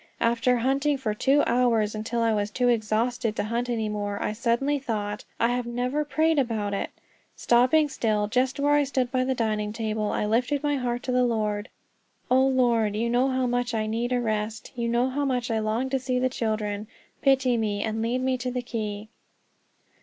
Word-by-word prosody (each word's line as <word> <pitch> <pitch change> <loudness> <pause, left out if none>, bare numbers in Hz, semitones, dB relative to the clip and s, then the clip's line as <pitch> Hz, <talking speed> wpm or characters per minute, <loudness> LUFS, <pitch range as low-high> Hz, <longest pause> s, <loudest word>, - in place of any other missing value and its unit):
After 235 +2 +2
hunting 275 +4 +1
for 230 -6 -2
two 275 +7 +3
hours, 235 -3 +2
until 225 +2 -2
I 225 -1 +2
was 205 -1 0
too 245 +3 +1
exhausted 230 +1 0
to - - -1
hunt 235 +3 -2
any 225 -2 -1
more, 205 -1 -3
I - - -2
suddenly 240 +6 0
thought, 210 -5 -3
"I 230 - +3
have 245 0 -1
never 250 +5 -1
prayed 315 +1 +2
about 220 -6 -1
it." 200 - -2 0.5
Stopping 255 +6 +3
still 215 -6 0
just 255 +4 0
where 290 +1 +3
I 290 0 +4
stood 260 -3 -1
by 255 -1 +1
the 260 0 0
dining 215 -3 -1
table, 215 -1 -2
I - - -1
lifted 250 +7 0
my 290 -1 +1
heart 245 -1 -2
to 255 - -2
the 250 0 +3
Lord. 215 -3 -1 0.6
"O 260 +1 +5
Lord, 240 -5 +2
you 235 +2 0
know 245 +2 +3
how 260 -1 0
much 245 -1 -1
I 215 -1 0
need 230 +3 -2
a 250 - +2
rest; 215 -1 -3
you 235 -1 -2
know 240 +2 +2
how 280 +2 -2
much 250 -3 -1
I 220 - +1
long 220 +4 -1
to 270 - +1
see 255 0 -1
the 255 +1 +1
children; 215 -3 -2 0.3
pity 265 -2 +3
me, 210 -3 -1
and 220 0 -2
lead 240 +3 0
me 260 -1 0
to 250 +1 -2
the 250 0 -3
key." 215 -3 -4
240 Hz, 205 wpm, -26 LUFS, 215-255 Hz, 0.6 s, O